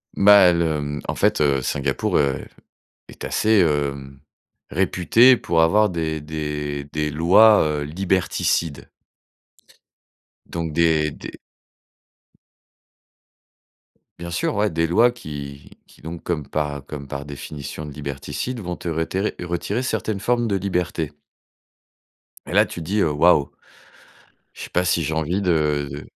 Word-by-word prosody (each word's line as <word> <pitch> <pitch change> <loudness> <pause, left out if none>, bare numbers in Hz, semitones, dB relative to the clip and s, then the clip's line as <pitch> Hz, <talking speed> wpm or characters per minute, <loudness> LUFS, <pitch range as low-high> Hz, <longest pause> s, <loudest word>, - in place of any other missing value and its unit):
Bah, 100 -3 +7
le, 80 -3 0
mmh, 75 0 -4
en - - -2
fait, - - +1
heu, 70 -3 +2
Singapour? 70 +1 -1
heu, 70 -2 0 0.6
est - - -10
assez, 110 -2 +2
hem, 70 -4 -1 0.5
réputée 95 +8 +4
pour 85 -5 +1
avoir 105 +6 +4
des 80 -2 -3
des 75 -1 -4
des 75 -1 -1
lois, 95 +8 +6
heu, 75 -1 -1
liberticides. 85 -2 -1 1.6
Donc 85 -2 -5
des, 80 -2 +2
des - - -10 2.8
bien 85 0 -6
sûr, - - -1
ouais. 105 0 +2
Des 80 0 0
lois 115 +9 +4
qui 70 -9 -9
qui - - -21
donc, 80 +2 -8
comme 80 -5 -3
par 75 -2 -3
comme 70 -2 -8
par 70 0 -5
définition 70 +1 -7
de 75 - -8
liberticides, 75 - -5
vont 90 -3 -5
te 85 - -6
reterrer 85 +5 -2
retirer 90 +7 -2
certaines 110 -5 -2
formes 120 +3 0
de 100 -2 0
liberté. 90 -5 -2 1.3
Et - - -6
là, - - +5
tu - - -8
te - - -7
dis: 105 +4 -1
«Heu, 80 - +2
waouh. 75 -1 +3 1.0
Je - - -9
sais - - -10
pas 90 +1 +1
si 85 -1 +1
j'ai 80 +1 -2
envie 80 +5 -1
de 75 -5 +1
de 70 +2 -8
80 Hz, 140 wpm, -22 LUFS, 75-90 Hz, 2.8 s, Bah